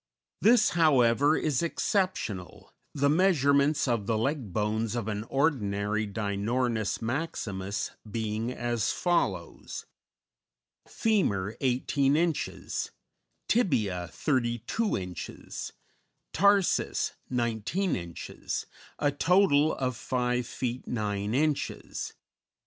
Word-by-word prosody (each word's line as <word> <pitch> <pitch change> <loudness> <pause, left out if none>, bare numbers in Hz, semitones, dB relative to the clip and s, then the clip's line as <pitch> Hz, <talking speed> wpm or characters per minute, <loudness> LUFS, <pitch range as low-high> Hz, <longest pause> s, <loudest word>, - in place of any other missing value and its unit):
This, 225 +1 +6
however, 145 -2 +4
is 150 -5 0
exceptional, 170 - -2 0.2
the 140 0 +1
measurements 145 -4 +3
of 115 -5 0
the 115 - +1
leg 130 -2 -1
bones 110 +3 -1
of 115 -3 -2
an 105 0 -3
ordinary 110 -7 0
Dinornis 110 +3 -1
maximus 105 -7 -3 0.2
being 110 +2 -2
as 120 -3 -1
follows: 95 - -1 1.0
Femur, 110 - +1
18 135 +2 +2
inches; 165 -2 -1 0.6
tibia, 110 - +1
32 120 - 0
inches; 90 -2 -6 0.6
tarsus, 200 +1 +3 0.2
19 120 - 0
inches, 85 -2 -5 0.3
a 145 -1 +2
total 155 -1 +4
of 130 -2 -1
5 125 +1 -1
feet 125 -1 -4
9 105 -1 -1
inches. 150 +1 -1
125 Hz, 90 wpm, -28 LUFS, 105-150 Hz, 1.0 s, This